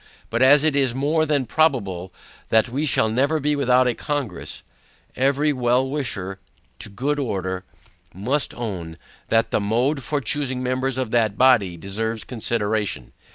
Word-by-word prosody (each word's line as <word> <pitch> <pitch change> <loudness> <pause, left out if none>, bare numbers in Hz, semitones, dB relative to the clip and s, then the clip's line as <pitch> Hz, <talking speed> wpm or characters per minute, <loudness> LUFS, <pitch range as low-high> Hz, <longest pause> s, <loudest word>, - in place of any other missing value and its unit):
But 115 +2 0
as 140 +2 +6
it 155 -2 +2
is 135 -4 +1
more 155 +4 +1
than 140 -3 +1
probable 100 - 0 0.4
that 110 +2 +3
we 140 +5 -1
shall 110 - +3
never 140 +8 +1
be 150 +1 +1
without 130 -2 +3
a 125 - +2
CONGRESS, 140 - -4 0.5
every 140 +3 +2
well 125 0 +2
wisher 105 -9 -3 0.4
to - - -8
good 140 +8 -2
order, 95 -7 -3 0.5
must 125 +10 -1
own, 90 -9 -5 0.3
that 115 0 +2
the - - +1
mode 125 +8 +1
for 145 +4 -2
choosing 130 -2 -2
members 130 +1 -1
of 130 -4 -2
that 110 -4 +1
body, 115 -9 +4
deserves 110 +5 -3
consideration. 110 - -2
125 Hz, 155 wpm, -22 LUFS, 105-140 Hz, 0.5 s, as